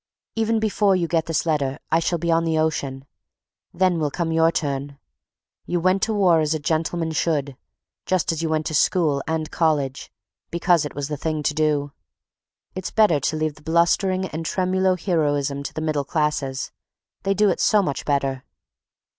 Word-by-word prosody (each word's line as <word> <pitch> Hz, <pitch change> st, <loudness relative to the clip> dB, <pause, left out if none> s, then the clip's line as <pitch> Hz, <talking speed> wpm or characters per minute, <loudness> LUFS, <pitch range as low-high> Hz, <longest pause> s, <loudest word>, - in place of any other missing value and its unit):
Even 225 Hz, 0 st, +1 dB
before 210 Hz, -2 st, +2 dB
you 175 Hz, -2 st, 0 dB
get 165 Hz, -1 st, 0 dB
this 165 Hz, 0 st, 0 dB
letter 145 Hz, -4 st, 0 dB
I 165 Hz, -, +4 dB
shall 170 Hz, +1 st, 0 dB
be 170 Hz, +1 st, -1 dB
on 165 Hz, 0 st, +3 dB
the 165 Hz, -1 st, 0 dB
ocean; 140 Hz, -4 st, -1 dB, 0.7 s
then 185 Hz, -2 st, +1 dB
will 150 Hz, -2 st, 0 dB
come 165 Hz, +3 st, -2 dB
your 165 Hz, 0 st, +3 dB
turn. 140 Hz, -2 st, -3 dB, 0.7 s
You 175 Hz, -, 0 dB
went 185 Hz, +3 st, +2 dB
to 225 Hz, -, +1 dB
war 180 Hz, -5 st, +4 dB
as 155 Hz, 0 st, +1 dB
a -, -, -2 dB
gentleman 160 Hz, +2 st, -1 dB
should, 145 Hz, -4 st, -1 dB, 0.5 s
just 185 Hz, -3 st, +1 dB
as 165 Hz, -1 st, -3 dB
you 165 Hz, -, -1 dB
went 155 Hz, -1 st, 0 dB
to 160 Hz, -, -3 dB
school 150 Hz, -2 st, +2 dB
and 160 Hz, -1 st, -2 dB
college, 145 Hz, -5 st, 0 dB, 0.4 s
because 170 Hz, -2 st, +2 dB
it 145 Hz, -, -7 dB
was 140 Hz, -1 st, -3 dB
the 150 Hz, -1 st, -4 dB
thing 155 Hz, 0 st, -2 dB
to -, -, +1 dB
do. 150 Hz, -2 st, 0 dB, 0.8 s
It's 185 Hz, 0 st, -4 dB
better 210 Hz, -9 st, +3 dB
to 140 Hz, -, -1 dB
leave 155 Hz, -1 st, -1 dB
the 150 Hz, -, -19 dB
blustering 170 Hz, +4 st, +2 dB
and 160 Hz, +1 st, -5 dB
tremulo 185 Hz, +2 st, +1 dB
heroism 145 Hz, -5 st, 0 dB
to 140 Hz, -, -5 dB
the 155 Hz, -, -3 dB
middle 155 Hz, -2 st, 0 dB
classes; 145 Hz, -3 st, -1 dB, 0.5 s
they 195 Hz, 0 st, 0 dB
do 210 Hz, +1 st, +4 dB
it -, -, -3 dB
so 210 Hz, -2 st, +4 dB
much 145 Hz, -6 st, -3 dB
better. 135 Hz, -2 st, -1 dB
160 Hz, 185 wpm, -23 LUFS, 145-175 Hz, 0.8 s, I